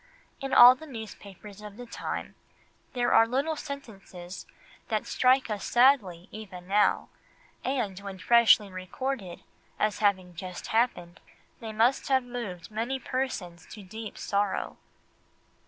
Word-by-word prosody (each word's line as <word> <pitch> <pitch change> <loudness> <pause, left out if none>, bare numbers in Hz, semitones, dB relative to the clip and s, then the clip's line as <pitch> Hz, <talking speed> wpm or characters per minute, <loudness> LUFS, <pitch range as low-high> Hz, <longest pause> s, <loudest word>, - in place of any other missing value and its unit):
In 270 0 -5
all 245 +1 +10
the 315 +5 -12
newspapers 210 - -10
of 210 -1 -10
the 245 - -8
time, 230 - -5 0.6
there 245 -2 +1
are 225 0 +6
little 275 +6 0
sentences 195 -11 -9 0.4
that 215 -2 -1
strike 255 +1 +3
us 205 -2 -3
sadly 225 -9 +3
even 185 -5 -9
now, 205 +2 +2 0.5
and 235 -8 -2
when 200 -1 -8
freshly 220 0 +5
recorded, 185 +2 -5 0.3
as 210 -3 0
having 190 -4 +1
just 180 +1 -7
happened, 175 -7 0 0.4
they 225 -1 -6
must 230 +5 +2
have 265 -1 +3
moved 230 -8 -7
many 230 +5 -2
persons 235 -10 -4
to 210 - -11
deep 220 +3 -8
sorrow. 200 -1 -1
215 Hz, 130 wpm, -28 LUFS, 190-245 Hz, 0.6 s, all